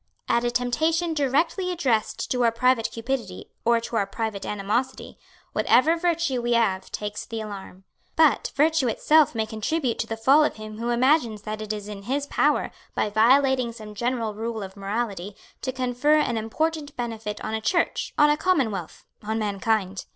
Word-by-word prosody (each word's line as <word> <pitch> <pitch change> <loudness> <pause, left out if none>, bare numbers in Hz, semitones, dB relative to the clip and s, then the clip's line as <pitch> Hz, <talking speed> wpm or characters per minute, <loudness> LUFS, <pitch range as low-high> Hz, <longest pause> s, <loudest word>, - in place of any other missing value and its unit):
At 235 - +2
a 240 - +1
temptation 315 +8 0
directly 315 +6 +1
addressed 255 -11 -1
to 250 -1 +1
our 230 - +4
private 245 0 +2
cupidity 230 -5 -4
or 235 0 +3
to 230 0 -3
our 200 -2 +1
private 215 -1 -4
animosity, 215 +6 -2 0.3
whatever 310 +7 +4
virtue 335 -6 0
we 240 0 0
have 195 -5 +1
takes 210 0 -4
the 225 - -6
alarm. 195 -3 -8 0.3
But, 315 -3 +3
virtue 305 -1 +3
itself 300 +4 +3
may 220 -1 0
contribute 230 +5 -2
to 225 - -1
the 225 - -4
fall 270 +7 +5
of - - 0
him 215 0 -9
who 235 +1 -2
imagines 240 -3 +2
that 215 0 -5
it 215 0 -4
is 210 -1 -5
in 205 -1 -7
his 275 +7 -2
power, - - +1 0.2
by 210 - 0
violating 255 +2 +3
some 215 -2 -10
general 235 0 -2
rule 225 0 -4
of 190 0 -9
morality, 200 -1 -3 0.3
to 260 - -2
confer 255 +4 +1
an 270 -6 +1
important 295 +7 -2
benefit 225 -3 -4
on - - -3
a 220 - -2
church, 340 +8 0
on 295 0 +6
a 295 - +1
commonwealth, 250 - -1 0.2
on 220 +1 -2
mankind. 205 -2 -1
235 Hz, 175 wpm, -25 LUFS, 215-275 Hz, 0.3 s, on